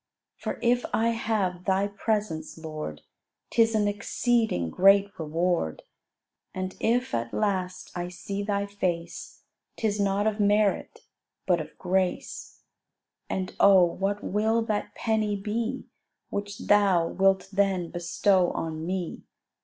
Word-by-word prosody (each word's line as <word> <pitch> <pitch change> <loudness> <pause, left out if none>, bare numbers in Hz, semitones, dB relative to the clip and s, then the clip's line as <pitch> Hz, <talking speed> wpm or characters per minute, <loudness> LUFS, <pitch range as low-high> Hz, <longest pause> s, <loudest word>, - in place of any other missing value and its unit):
For - - -4
if 245 +1 +3
I 230 +1 +2
have 210 -6 -1
Thy 195 0 +2
presence, 200 -6 -2
Lord, 155 - -6 0.5
'Tis 225 -1 +3
an 210 -1 +2
exceeding 205 - 0
great 195 +1 +5
reward; 165 - -1 0.7
And 185 0 -4
if 245 +3 +1
at 115 0 -2
last 185 -3 -1
I 175 0 -3
see 195 +3 -5
Thy 200 -1 -1
face, 180 -4 -4 0.3
'Tis 210 -2 0
not 200 +1 +1
of 215 0 0
merit, 205 0 +2 0.4
but 175 -3 +2
of 155 - -10
grace. 185 0 -2 0.7
And, 185 -1 -3
oh, 195 -2 +7
what 195 +4 -2
will 220 +3 +1
that 215 -2 -3
"penny" 215 -2 0
be 225 +6 -3 0.5
Which 200 0 -4
Thou 195 -5 +4
wilt 195 +1 +2
then 190 -3 +1
bestow 180 +1 +2
on 160 -1 -4
me? 180 0 -3
195 Hz, 125 wpm, -27 LUFS, 180-210 Hz, 0.7 s, oh